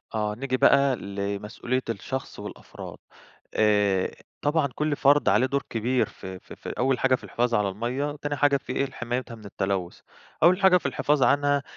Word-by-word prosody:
آه، 105 Hz, -1 st, -1 dB
نيجي 130 Hz, +1 st, -2 dB
بقى 140 Hz, 0 st, +5 dB
لمسؤولية 100 Hz, +5 st, -3 dB
الشخص 125 Hz, +5 st, -5 dB
والأفراد، -, -, -9 dB, 0.6 s
آآ 105 Hz, -3 st, +2 dB, 0.3 s
طبعًا 145 Hz, -1 st, +2 dB
كل 150 Hz, -1 st, 0 dB
فرد 145 Hz, +1 st, +4 dB
عليه 130 Hz, -, +4 dB
دور 140 Hz, +1 st, -1 dB
كبير 120 Hz, +3 st, 0 dB
في 95 Hz, -1 st, -9 dB
في -, -, -13 dB
في -, -, -7 dB
أول 130 Hz, 0 st, +2 dB
حاجة 135 Hz, -1 st, +3 dB
في -, -, -3 dB
الحفاظ 120 Hz, 0 st, -1 dB
على 105 Hz, -2 st, +2 dB
المَيّة، 125 Hz, +9 st, -3 dB
تاني 145 Hz, 0 st, -2 dB
حاجة 145 Hz, -1 st, +3 dB
في 130 Hz, -, -6 dB
إيه 140 Hz, -, +1 dB
لحمايتها 120 Hz, -1 st, -4 dB
من 110 Hz, -2 st, -13 dB
التلوث، 95 Hz, -3 st, -3 dB, 0.4 s
أول 180 Hz, +3 st, +5 dB
حاجة 190 Hz, -2 st, +6 dB
في -, -, -4 dB
الحفاظ 145 Hz, -2 st, +1 dB
عنها، 145 Hz, 0 st, +3 dB
130 Hz, 175 wpm, -26 LUFS, 105-140 Hz, 0.6 s, حاجة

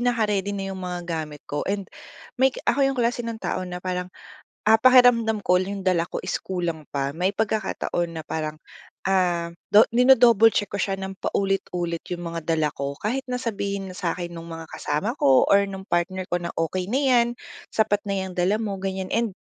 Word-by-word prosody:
naka-ready 215 Hz, -5 st, +1 dB
na 195 Hz, 0 st, -4 dB
'yung 190 Hz, -, -7 dB
mga 180 Hz, -1 st, -4 dB
gamit 155 Hz, -3 st, -5 dB
ko 145 Hz, -, -3 dB
and 200 Hz, 0 st, -1 dB, 0.6 s
may 265 Hz, -, +6 dB, 0.2 s
ako 280 Hz, -, +2 dB
'yung 270 Hz, -, -2 dB
klase 240 Hz, +1 st, +1 dB
ng 230 Hz, -1 st, -4 dB
tao -, -, -2 dB
na 180 Hz, 0 st, -5 dB
parang, 180 Hz, 0 st, -2 dB, 0.6 s
ah, 220 Hz, +1 st, +6 dB
pakiramdam 245 Hz, -4 st, +5 dB
ko 180 Hz, 0 st, +4 dB
'yung 195 Hz, 0 st, -5 dB
dala 170 Hz, -2 st, +2 dB
ko -, -, -4 dB
is -, -, -1 dB
kulang 175 Hz, -4 st, -3 dB
pa. 140 Hz, 0 st, -2 dB
May 180 Hz, +3 st, +1 dB
pagkakataon 200 Hz, -5 st, -2 dB
na -, -, -6 dB
parang, 155 Hz, -1 st, -3 dB, 0.5 s
ah, 175 Hz, -3 st, +1 dB, 0.2 s
do 210 Hz, -, +9 dB
dino-double 235 Hz, -3 st, +6 dB
check 205 Hz, -, 0 dB
ko 200 Hz, -, -4 dB
siya 195 Hz, 0 st, 0 dB
ng 190 Hz, 0 st, -5 dB
paulit-ulit 180 Hz, -4 st, -1 dB
'yung 175 Hz, -, -3 dB
mga 165 Hz, -1 st, -5 dB
dala 160 Hz, -2 st, +2 dB
ko. 140 Hz, 0 st, -3 dB
Kahit 250 Hz, +6 st, -1 dB
na 250 Hz, -, -1 dB
sabihin 200 Hz, -4 st, -3 dB
na -, -, -11 dB
sa 180 Hz, -4 st, -1 dB
akin 175 Hz, -1 st, -6 dB
nung 165 Hz, 0 st, -8 dB
mga 165 Hz, 0 st, -7 dB
kasama 175 Hz, -, -2 dB
ko 135 Hz, -1 st, +5 dB
or 200 Hz, 0 st, +6 dB
nung 190 Hz, 0 st, -8 dB
partner 175 Hz, +2 st, 0 dB
ko 175 Hz, -, +1 dB
na, 170 Hz, -1 st, -5 dB
"Okey 180 Hz, +3 st, -1 dB
na 260 Hz, -, +2 dB
'yan, 250 Hz, -4 st, +4 dB, 0.5 s
sapat 220 Hz, -2 st, +2 dB
na 200 Hz, -, -1 dB
'yang 190 Hz, -1 st, -5 dB
dala 195 Hz, +5 st, +2 dB
mo," 205 Hz, -3 st, -3 dB
ganiyan 190 Hz, 0 st, -4 dB
and 230 Hz, -3 st, 0 dB
190 Hz, 200 wpm, -24 LUFS, 175-220 Hz, 0.6 s, do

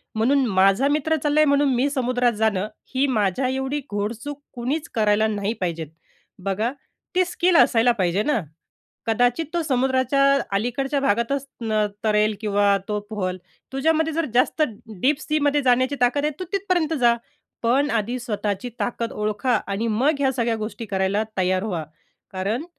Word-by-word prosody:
म्हणून 260 Hz, +5 st, +3 dB
माझा 195 Hz, +4 st, +3 dB
मित्र 305 Hz, +2 st, +1 dB
चाललंय 300 Hz, +1 st, +4 dB
म्हणून 285 Hz, -1 st, +3 dB
मी 260 Hz, +4 st, +2 dB
समुद्रात 250 Hz, -3 st, +1 dB
जाणं, 210 Hz, -2 st, 0 dB, 0.3 s
ही 270 Hz, +2 st, +3 dB
माझ्या 220 Hz, 0 st, +1 dB
एवढी 265 Hz, +2 st, -2 dB
घोडचूक 230 Hz, +8 st, -4 dB
कुणीच 270 Hz, +6 st, -3 dB
करायला 215 Hz, -1 st, +3 dB
नाही 205 Hz, 0 st, -1 dB
पाहिजेत. 165 Hz, -3 st, -2 dB, 0.6 s
बघा, 210 Hz, +5 st, -1 dB, 0.4 s
ती 370 Hz, -, +4 dB
स्किल 355 Hz, 0 st, +1 dB
असायला 240 Hz, -3 st, +5 dB
पाहिजे 185 Hz, +3 st, +1 dB
ना? 295 Hz, -3 st, +1 dB, 0.7 s
कदाचित 245 Hz, +7 st, +2 dB
तो 345 Hz, -, +1 dB
समुद्राच्या 260 Hz, -1 st, +1 dB, 0.3 s
अलीकडच्या 265 Hz, +6 st, -1 dB
भागातच 260 Hz, +3 st, 0 dB, 0.6 s
तरेल 215 Hz, 0 st, +2 dB
किंवा 205 Hz, -1 st, +3 dB
तो 210 Hz, -1 st, -1 dB
पोहेल. 185 Hz, -4 st, -2 dB, 0.4 s
तुझ्यामध्ये 320 Hz, +3 st, +1 dB
जर 330 Hz, +1 st, 0 dB
जास्त 250 Hz, +5 st, +2 dB, 0.4 s
डीप 280 Hz, +2 st, +2 dB
सीमध्ये 295 Hz, -1 st, +1 dB
जाण्याची 255 Hz, +2 st, +3 dB
ताकद 270 Hz, +4 st, +2 dB
आहे, 300 Hz, -, 0 dB
तू 370 Hz, -, -4 dB
तिथपर्यंत 365 Hz, -5 st, 0 dB
जा. 235 Hz, -1 st, +5 dB, 0.5 s
पण 265 Hz, +5 st, +2 dB
आधी 230 Hz, +2 st, -1 dB
स्वतःची 215 Hz, -1 st, -3 dB
ताकद 235 Hz, -1 st, -2 dB
ओळखा 210 Hz, +4 st, 0 dB
आणि 205 Hz, +4 st, -2 dB
मग 260 Hz, +8 st, +2 dB
ह्या 270 Hz, -2 st, +2 dB
सगळ्या 235 Hz, -3 st, 0 dB
गोष्टी 220 Hz, +2 st, -5 dB
करायला 195 Hz, +1 st, 0 dB
तयार 185 Hz, 0 st, +1 dB
व्हा. 180 Hz, -7 st, -2 dB, 0.5 s
कारण 205 Hz, -, -2 dB
245 Hz, 145 wpm, -23 LUFS, 210-280 Hz, 0.7 s, असायला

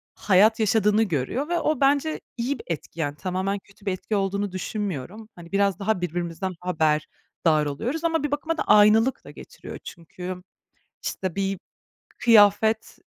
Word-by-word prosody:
hayat 210 Hz, +3 st, +4 dB
yaşadığını 215 Hz, 0 st, +3 dB
görüyor 195 Hz, -, -2 dB
ve 345 Hz, 0 st, +1 dB
o 305 Hz, -3 st, 0 dB
bence 285 Hz, +3 st, +2 dB, 0.2 s
iyi 250 Hz, +3 st, -2 dB
bir -, -, -11 dB
etki, 165 Hz, 0 st, -6 dB
yani, 145 Hz, -2 st, -1 dB
tamamen 190 Hz, +4 st, -2 dB
kötü 200 Hz, +1 st, -22 dB
bir 195 Hz, -, 0 dB
etki 200 Hz, +3 st, -3 dB
olduğunu 200 Hz, 0 st, -1 dB
düşünmüyorum. 200 Hz, -, -5 dB
Hani, 170 Hz, -1 st, -13 dB
biraz 200 Hz, -2 st, +1 dB
daha 200 Hz, -2 st, 0 dB
birbirimizden 175 Hz, +2 st, -3 dB
haberdar 155 Hz, -2 st, 0 dB
oluyoruz. 240 Hz, -, -3 dB
Ama 325 Hz, -2 st, +1 dB
bir 295 Hz, -, -2 dB
bakıma 315 Hz, +3 st, -2 dB
da -, -, 0 dB
aynılık 215 Hz, +4 st, +5 dB
da -, -, -10 dB
getiriyor -, -, -10 dB
çünkü 180 Hz, +2 st, -8 dB, 0.6 s
işte 185 Hz, -3 st, -3 dB
bir 195 Hz, -1 st, -1 dB, 0.6 s
kıyafet, 220 Hz, -1 st, +4 dB
200 Hz, 150 wpm, -24 LUFS, 180-225 Hz, 0.6 s, aynılık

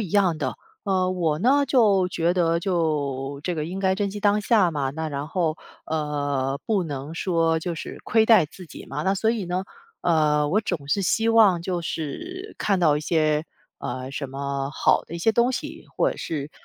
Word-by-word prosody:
一 200 Hz, -, -3 dB
样 185 Hz, -5 st, +2 dB
的。 -, -, -2 dB, 0.3 s
呃， 185 Hz, -2 st, +1 dB
我 165 Hz, -5 st, 0 dB
呢 280 Hz, +5 st, +4 dB
就 205 Hz, -8 st, +4 dB
觉 170 Hz, -1 st, +1 dB
得 170 Hz, -2 st, +2 dB
就 145 Hz, -6 st, -1 dB
这 180 Hz, -, -1 dB
个 155 Hz, -1 st, -2 dB
应 185 Hz, +3 st, -5 dB
该 190 Hz, -1 st, +2 dB
珍 200 Hz, 0 st, -1 dB
惜 205 Hz, -, -6 dB
当 205 Hz, 0 st, +3 dB
下 205 Hz, -4 st, +3 dB
嘛， 140 Hz, -4 st, -1 dB
那 160 Hz, +3 st, -4 dB
然 145 Hz, +1 st, -4 dB
后， 165 Hz, -3 st, -1 dB, 0.3 s
呃， 145 Hz, -3 st, -1 dB
不 210 Hz, -4 st, +1 dB
能 145 Hz, 0 st, -5 dB
说 165 Hz, -2 st, +1 dB
就 170 Hz, +1 st, -3 dB
是 165 Hz, -, -7 dB
亏 220 Hz, 0 st, +3 dB
待 220 Hz, -8 st, +6 dB
自 180 Hz, +3 st, -12 dB
己 -, -, -11 dB
嘛。 -, -, -4 dB
那 190 Hz, +1 st, +2 dB
所 220 Hz, +3 st, +1 dB
以 225 Hz, -4 st, -2 dB
呢， 180 Hz, +2 st, -2 dB, 0.4 s
呃， 150 Hz, -3 st, +2 dB
我 200 Hz, +8 st, +2 dB
总是 175 Hz, 0 st, -1 dB
希 225 Hz, +5 st, +1 dB
望 215 Hz, -6 st, +5 dB
就 175 Hz, 0 st, -3 dB
是 355 Hz, -, -5 dB
看 195 Hz, -2 st, +1 dB
到 155 Hz, -4 st, +4 dB
一 150 Hz, -, -2 dB
些， 155 Hz, -1 st, +1 dB, 0.3 s
呃， 130 Hz, +1 st, -5 dB
什 140 Hz, -1 st, -5 dB
么 140 Hz, 0 st, -3 dB
好 155 Hz, -, +2 dB
的 165 Hz, -, -9 dB
一 170 Hz, -, -4 dB
些 225 Hz, -, +3 dB
东 235 Hz, +3 st, +3 dB
西， -, -, -5 dB
或 -, -, +3 dB
者 -, -, -6 dB
是 150 Hz, -2 st, -4 dB
170 Hz, 220 characters per minute, -24 LUFS, 150-195 Hz, 0.4 s, 待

